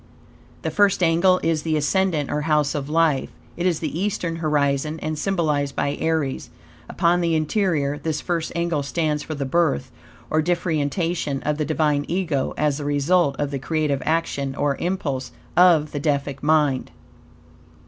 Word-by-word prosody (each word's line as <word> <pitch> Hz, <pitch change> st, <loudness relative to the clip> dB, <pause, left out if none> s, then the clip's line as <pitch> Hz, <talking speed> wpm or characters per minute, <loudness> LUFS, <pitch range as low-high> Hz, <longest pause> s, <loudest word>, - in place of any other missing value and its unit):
The -, -, -1 dB
first 200 Hz, -3 st, +3 dB
angle 175 Hz, +3 st, +4 dB
is 165 Hz, -2 st, +1 dB
the 155 Hz, 0 st, 0 dB
ascendant, 155 Hz, -1 st, +1 dB
or 150 Hz, -, 0 dB
House 150 Hz, -2 st, +1 dB
of 145 Hz, -1 st, -4 dB
Life. 160 Hz, -3 st, +2 dB, 0.3 s
It 175 Hz, +1 st, 0 dB
is 170 Hz, -4 st, 0 dB
the 160 Hz, 0 st, -3 dB
eastern 180 Hz, -4 st, -2 dB
horizon, 150 Hz, -1 st, 0 dB
and 155 Hz, +1 st, -3 dB
symbolized 150 Hz, -6 st, 0 dB
by 140 Hz, -, 0 dB
Aries. 160 Hz, -4 st, -1 dB, 0.4 s
Upon 175 Hz, 0 st, +2 dB
the 170 Hz, -1 st, +1 dB
interior, 155 Hz, -3 st, 0 dB
this 155 Hz, -2 st, -2 dB
first 170 Hz, -2 st, -2 dB
angle 170 Hz, -3 st, 0 dB
stands 150 Hz, +1 st, -1 dB
for 155 Hz, -, -5 dB
the 140 Hz, -1 st, -3 dB
birth, 135 Hz, -, +1 dB, 0.4 s
or 155 Hz, -, +3 dB
differentiation, 165 Hz, -2 st, -1 dB
of 150 Hz, 0 st, -1 dB
the 150 Hz, -, 0 dB
Divine 150 Hz, -1 st, +1 dB
Ego, 170 Hz, -7 st, -1 dB
as 150 Hz, -2 st, +1 dB
the 145 Hz, -, -5 dB
result 145 Hz, +1 st, +2 dB
of 145 Hz, -1 st, -2 dB
the 140 Hz, -, -3 dB
creative 150 Hz, -1 st, -1 dB
action, 140 Hz, -4 st, -1 dB
or 145 Hz, -1 st, 0 dB
impulse, 145 Hz, -8 st, -3 dB, 0.2 s
of 170 Hz, -4 st, +5 dB
the 145 Hz, -, -3 dB
Deific 140 Hz, -2 st, -1 dB
mind. 150 Hz, -3 st, +2 dB
155 Hz, 160 wpm, -23 LUFS, 145-170 Hz, 0.4 s, of